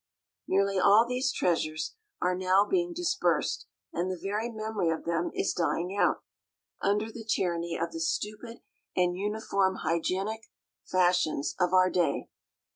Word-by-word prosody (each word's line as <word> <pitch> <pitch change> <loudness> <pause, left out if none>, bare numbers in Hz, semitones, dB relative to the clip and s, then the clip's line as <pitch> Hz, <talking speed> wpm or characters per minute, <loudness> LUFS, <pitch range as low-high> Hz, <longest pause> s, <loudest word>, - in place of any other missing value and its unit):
Nearly 195 0 +2
all 205 +5 +6
these 255 +1 0
treasures 155 -5 -1 0.3
are 180 0 +2
now 185 +2 +3
being 350 - 0
dispersed, 355 +3 0 0.3
and 175 +2 -1
the 185 - -3
very 210 +5 -2
memory 215 -5 -2
of 160 - -2
them 170 0 0
is - - 0
dying 175 +2 -1
out, - - +2 0.6
under 210 +3 +1
the 225 0 -8
tyranny 170 -5 -1
of 170 0 -2
the 165 - -6
stupid 215 +8 -3 0.3
and 180 -1 +2
uniform 200 -1 0
"hygienic" 190 +7 -1 0.4
fashions 180 -5 +1
of 180 -1 +2
our 185 0 +5
day. 175 -2 0
190 Hz, 140 wpm, -29 LUFS, 175-215 Hz, 0.6 s, all